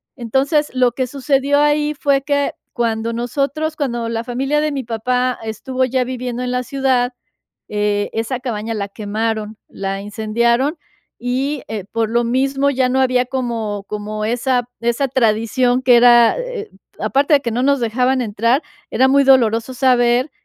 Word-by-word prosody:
Entonces, 275 Hz, +5 st, 0 dB
lo 250 Hz, -2 st, +2 dB
que 260 Hz, +1 st, -1 dB
sucedió 275 Hz, +2 st, +1 dB
ahí 295 Hz, 0 st, +2 dB
fue 280 Hz, -2 st, +1 dB
que 285 Hz, 0 st, 0 dB, 0.2 s
cuando 230 Hz, -1 st, -1 dB
nosotros, 280 Hz, +6 st, -2 dB
cuando 240 Hz, -6 st, -2 dB
la 230 Hz, 0 st, -2 dB
familia 270 Hz, +5 st, -1 dB
de 305 Hz, 0 st, 0 dB
mi 275 Hz, -2 st, -3 dB
papá 250 Hz, +2 st, -1 dB
estuvo 255 Hz, +4 st, -3 dB
ya 255 Hz, 0 st, +1 dB
viviendo 250 Hz, -1 st, -4 dB
en 250 Hz, 0 st, -2 dB
la 250 Hz, 0 st, -1 dB
ciudad, 255 Hz, -1 st, 0 dB, 0.6 s
eh, 205 Hz, 0 st, -1 dB
esa 230 Hz, +3 st, -2 dB
cabaña 225 Hz, -3 st, -3 dB
la 200 Hz, -1 st, -3 dB
quemaron, 215 Hz, +1 st, -3 dB
la 195 Hz, 0 st, -4 dB
incendiaron. 235 Hz, -, 0 dB, 0.4 s
Y, 260 Hz, +4 st, -2 dB
eh, 210 Hz, -3 st, -4 dB
por 225 Hz, -1 st, 0 dB
lo 235 Hz, +1 st, +1 dB
mismo 270 Hz, +3 st, +1 dB
ya 260 Hz, -2 st, +1 dB
no 260 Hz, +1 st, +1 dB
había 255 Hz, -1 st, +2 dB
como 230 Hz, -6 st, -3 dB
como 215 Hz, +1 st, -5 dB
esa 245 Hz, +1 st, 0 dB
esa 235 Hz, +4 st, 0 dB
tradición 245 Hz, +1 st, +1 dB
que 250 Hz, -2 st, +6 dB
era 240 Hz, -1 st, +6 dB
eh. -, -, -5 dB, 0.3 s
Aparte 280 Hz, +3 st, +1 dB
de 285 Hz, -, +5 dB
que 240 Hz, -, -3 dB
no 245 Hz, +3 st, -1 dB
nos 280 Hz, 0 st, +2 dB
dejaban 250 Hz, +3 st, +1 dB
entrar, 230 Hz, +5 st, +1 dB, 0.3 s
era 260 Hz, -, +3 dB
muy 275 Hz, +1 st, +4 dB
doloroso 235 Hz, -2 st, +3 dB
saber 245 Hz, +1 st, +2 dB
250 Hz, 160 wpm, -18 LUFS, 230-270 Hz, 0.6 s, que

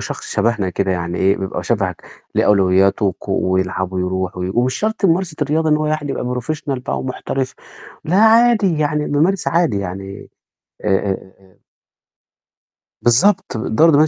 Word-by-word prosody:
شخص -, -, -6 dB
شبهنا 110 Hz, -5 st, 0 dB
كده، 95 Hz, +1 st, -1 dB
يعني 85 Hz, 0 st, -3 dB
إيه، 95 Hz, +1 st, +3 dB
بيبقى 95 Hz, -2 st, -4 dB
شبهك 95 Hz, -3 st, -1 dB, 0.3 s
ليه -, -, +2 dB
أولوياته 95 Hz, +1 st, +3 dB
وك 95 Hz, -, -4 dB
ويلعب 95 Hz, 0 st, -1 dB
ويرُوح 95 Hz, 0 st, -2 dB
وي 90 Hz, 0 st, -3 dB
ومش 125 Hz, +2 st, +1 dB
شرط 215 Hz, -1 st, -2 dB
ممارسة 170 Hz, -2 st, +1 dB
الرياضة 155 Hz, +2 st, 0 dB
إن 150 Hz, -, +4 dB
هو 155 Hz, 0 st, -1 dB
يعني 155 Hz, -2 st, -2 dB
يبقى -, -, -3 dB, 0.2 s
professional 140 Hz, +1 st, -3 dB
بقى -, -, -3 dB
ومحترف، 130 Hz, 0 st, -3 dB, 0.5 s
لأ 175 Hz, +4 st, 0 dB
عادي 220 Hz, -5 st, +4 dB
يعني 150 Hz, 0 st, 0 dB
بامارس 170 Hz, +7 st, +1 dB
عادي، 165 Hz, -, +1 dB
يعني 95 Hz, +1 st, -7 dB, 0.6 s
آآ 95 Hz, -1 st, -3 dB, 1.5 s
بالضبط، 190 Hz, -, +3 dB
الدورة 110 Hz, +8 st, +2 dB
الدموية 155 Hz, 0 st, +5 dB
120 Hz, 145 wpm, -18 LUFS, 95-155 Hz, 1.5 s, الدموية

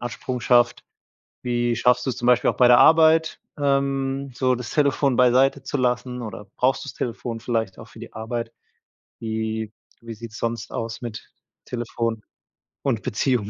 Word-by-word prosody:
Absprung 120 Hz, +1 st, -4 dB
schafft. 120 Hz, 0 st, +3 dB, 0.6 s
Wie 120 Hz, -1 st, 0 dB
schaffst 125 Hz, +1 st, +2 dB
du's 130 Hz, -, -1 dB
zum 120 Hz, -, -4 dB
Beispiel 125 Hz, -1 st, +4 dB
auch -, -, -14 dB
bei 125 Hz, -, +6 dB
der 120 Hz, -, +8 dB
Arbeit, 160 Hz, 0 st, +5 dB, 0.2 s
ähm, 140 Hz, -1 st, 0 dB
so 130 Hz, +1 st, +1 dB
das 125 Hz, -1 st, -6 dB
Telefon 140 Hz, -3 st, +2 dB
beiseite 130 Hz, +2 st, +4 dB
zu 135 Hz, -, -5 dB
lassen, 125 Hz, 0 st, -1 dB
oder 105 Hz, -3 st, -7 dB
brauchst 130 Hz, +4 st, +1 dB
du's 140 Hz, -, -7 dB
Telefon 115 Hz, -1 st, -4 dB
vielleicht 115 Hz, -4 st, -2 dB
auch -, -, -11 dB
für -, -, -14 dB
die -, -, -10 dB
Arbeit? 115 Hz, +1 st, -4 dB, 0.7 s
Wie 110 Hz, -1 st, -3 dB, 0.3 s
wie 115 Hz, -, -6 dB
sieht’s 110 Hz, 0 st, -9 dB
sonst 115 Hz, 0 st, -3 dB
aus 115 Hz, 0 st, -4 dB
mit 115 Hz, -2 st, -8 dB, 0.3 s
Telefon 115 Hz, -2 st, -3 dB, 0.6 s
und 120 Hz, -6 st, 0 dB
Beziehung? 125 Hz, -2 st, 0 dB
120 Hz, 160 wpm, -23 LUFS, 115-130 Hz, 0.7 s, der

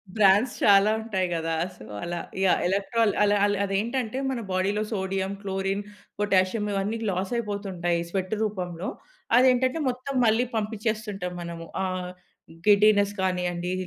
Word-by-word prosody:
Brands 210 Hz, +3 st, +4 dB
చాలా 200 Hz, 0 st, +6 dB
ఉంటాయి 200 Hz, -5 st, -1 dB
గదా! 165 Hz, -1 st, -1 dB, 0.2 s
సో, -, -, -12 dB, 0.2 s
అలా 175 Hz, 0 st, -3 dB, 0.2 s
యాహ్. 190 Hz, -, +4 dB
ఎలక్ట్రాల్ 200 Hz, +3 st, +1 dB
అల 205 Hz, 0 st, +3 dB
అల 205 Hz, 0 st, +1 dB
అదేంటంటే 225 Hz, +5 st, -1 dB
మన 260 Hz, -2 st, -2 dB
బాడీలో 200 Hz, +3 st, +1 dB
సోడియం, 190 Hz, -1 st, -2 dB
క్లోరిన్, 195 Hz, 0 st, -2 dB, 0.4 s
పొటాషియం 205 Hz, +1 st, +2 dB
ఇవన్నీ 200 Hz, +3 st, -1 dB
లాసయిపోతుంటాయి 190 Hz, -3 st, -2 dB
స్వెట్ 185 Hz, +2 st, -2 dB
రూపంలో. 180 Hz, -4 st, -3 dB, 0.5 s
అదేంటంటే 255 Hz, +3 st, +4 dB
మొత్తం 255 Hz, +2 st, -4 dB
మళ్ళీ 225 Hz, +2 st, +3 dB
పంపించేస్తుంటాం 215 Hz, -3 st, -2 dB
మనము. 170 Hz, -1 st, -7 dB, 0.2 s
ఆహ్, 185 Hz, -1 st, -3 dB, 0.6 s
గిడ్డీనెస్ 205 Hz, -1 st, +5 dB
కానియండి 180 Hz, -1 st, -1 dB
200 Hz, 120 wpm, -26 LUFS, 185-215 Hz, 0.6 s, చాలా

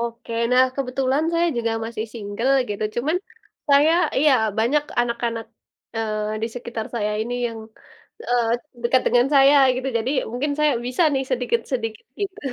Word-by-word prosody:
Oke, 235 Hz, 0 st, -5 dB, 0.2 s
nah 255 Hz, +1 st, +6 dB
kebetulan 270 Hz, +2 st, 0 dB
saya 340 Hz, +1 st, +2 dB
juga 230 Hz, -1 st, 0 dB
masih 225 Hz, -1 st, -4 dB
single 225 Hz, +4 st, -1 dB, 0.2 s
gitu 205 Hz, +1 st, -3 dB
cuman, 295 Hz, +8 st, 0 dB, 0.5 s
saya 290 Hz, +3 st, +5 dB, 0.3 s
iya 295 Hz, 0 st, +5 dB, 0.3 s
banyak 260 Hz, +7 st, +2 dB, 0.2 s
anak-anak, 235 Hz, -1 st, -2 dB, 0.5 s
eee, 215 Hz, -1 st, -2 dB
di -, -, +1 dB
sekitar 235 Hz, -2 st, -5 dB
saya 210 Hz, -2 st, -1 dB
ini 240 Hz, +2 st, -3 dB
yang, 230 Hz, -, -8 dB, 0.7 s
eee, 240 Hz, -2 st, +2 dB, 0.3 s
dekat 250 Hz, +2 st, +3 dB
dengan 245 Hz, +1 st, +4 dB
saya 275 Hz, +1 st, +7 dB, 0.2 s
gitu, 260 Hz, +1 st, -3 dB
jadi 235 Hz, +4 st, -2 dB, 0.2 s
mungkin 280 Hz, +4 st, -1 dB
saya 300 Hz, -1 st, +3 dB
bisa 250 Hz, +7 st, 0 dB
nih 270 Hz, 0 st, 0 dB
sedikit 245 Hz, -2 st, 0 dB
sedikit 225 Hz, -4 st, -3 dB
gitu. 400 Hz, 0 st, -3 dB
245 Hz, 155 wpm, -22 LUFS, 225-270 Hz, 0.7 s, saya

